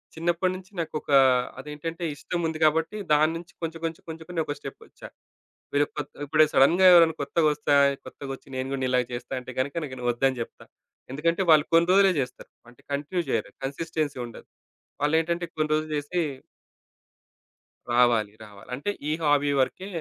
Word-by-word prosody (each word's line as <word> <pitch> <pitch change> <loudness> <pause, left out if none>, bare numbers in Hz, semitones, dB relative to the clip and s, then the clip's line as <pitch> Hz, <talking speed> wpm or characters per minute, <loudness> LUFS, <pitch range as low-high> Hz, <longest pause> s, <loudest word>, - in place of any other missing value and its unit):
చిన్నప్పటి 175 +2 0
నుంచి 190 +2 -11
నాకు 165 - -3
ఒక - - -7 0.5
అదేంటంటే 150 +4 -6
ఇష్టం 170 +5 -4
ఉంది 160 -1 -3
కాబట్టి 160 +6 +1 0.2
దాన్నుంచి 165 +3 +1
కొంచెం 165 0 -4
కొంచెం 165 0 -5
కొంచెం 160 0 -8
కొన్ని 170 -2 -1
ఒక 145 - -3
స్టెపొచ్చా. - - -11 0.7
వేరే 145 0 +3
కొత్త 150 - -4 0.2
ఇప్పుడు 155 +2 +5
సడెన్‌గా 175 +8 +5
ఎవరైనా 165 -2 +6
కొత్తగోచ్చాయి 145 -2 +2
కొత్తగా 135 -1 -8
వచ్చి 135 - -15
నేను 130 0 -2
కూడా 135 - -2
నీలాగా 125 -1 +1
చేస్తా 120 - -7
అంటే 125 0 -9
గనక 140 +2 -2
నేను 130 -2 -8
వద్దని 130 +2 +1
చెప్తా. - - -11 0.5
ఎందుకంటే 165 +6 0
వాళ్ళు 150 -1 +6
కొన్ని 170 +1 +5
రోజులే 195 -1 +6
చేస్తారు. 125 -1 -6 0.2
అంటే 120 - -22
కంటిన్యూ 150 +6 -1
చెయ్యరు. 110 - -1
కన్సిస్టెన్సీ 145 0 -3
ఉండదు. 120 - -13 0.5
వాళ్ళేంటంటే 165 +3 +1
కొన్ని 155 -1 0
రోజులు 155 0 -1
చేసి 145 +5 -2 1.7
రావాలి. 120 -4 +3
రావాలి. 105 -2 -14
అంటే 145 +10 -2 0.2
ఈ - - +1
హాబీ 145 -1 +3
వరకే 185 +8 -2
150 Hz, 155 wpm, -26 LUFS, 135-165 Hz, 1.7 s, ఎవరైనా